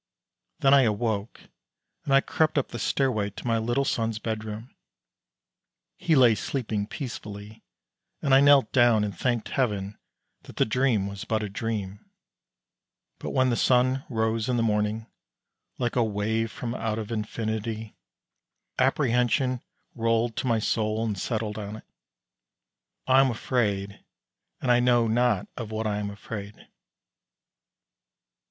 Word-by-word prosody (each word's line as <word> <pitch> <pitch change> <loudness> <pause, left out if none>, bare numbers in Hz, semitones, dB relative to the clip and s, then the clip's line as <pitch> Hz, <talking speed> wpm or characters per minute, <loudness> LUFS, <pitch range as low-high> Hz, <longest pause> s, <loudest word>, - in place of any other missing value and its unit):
Then 135 0 +5
I 140 - +7
awoke, 110 -2 -1 0.6
and 135 - 0
I 135 - +6
crept 155 +1 0
up 140 - +1
the 120 - -6
stairway 125 -7 +1
way - - -4
to 100 - -11
my 115 -1 +1
little 120 +5 0
son's 115 -4 -1
bedroom. 110 +1 -5 1.2
He 165 - +1
lay 125 -4 +6
sleeping 110 -3 -3
peacefully. 105 -5 -7 0.6
And 140 - +1
I 135 - +7
knelt 140 -1 +5
down 120 -4 +4
and 105 -2 -3
thanked 120 -3 -1
Heaven 105 -6 -1 0.4
that - - -13
the - - +3
dream 115 -3 +1
was 100 0 -6
but 110 -1 -1
a 105 - -3
dream; 100 -1 -4 1.2
but - - -5
when 130 -1 +2
the - - +1
sun 130 +2 +2
rose 110 -1 0
in 125 - +1
the 115 - +2
morning, 105 0 0 0.7
like 120 -2 -1
a 120 - +3
wave 110 +1 -1
from 120 -1 -5
out 110 -3 -2
of 110 0 -5
infinity, 110 0 -3 0.8
apprehension 125 -1 +2 0.3
rolled 115 0 0
to 130 - -1
my 115 -2 +3
soul 110 0 0
and 105 -2 -1
settled 110 -1 -2
on 105 0 -6
it. 110 - -11 1.2
I 130 0 +5
am 135 - +3
afraid, 105 -4 -1 0.6
and 125 - +2
I 120 - +5
know 120 -1 +3
not 120 -2 +1
of 115 -3 -6
what 110 0 -3
I 105 -1 -1
am 100 -1 -3
afraid. 100 0 -7
115 Hz, 145 wpm, -26 LUFS, 105-125 Hz, 1.2 s, I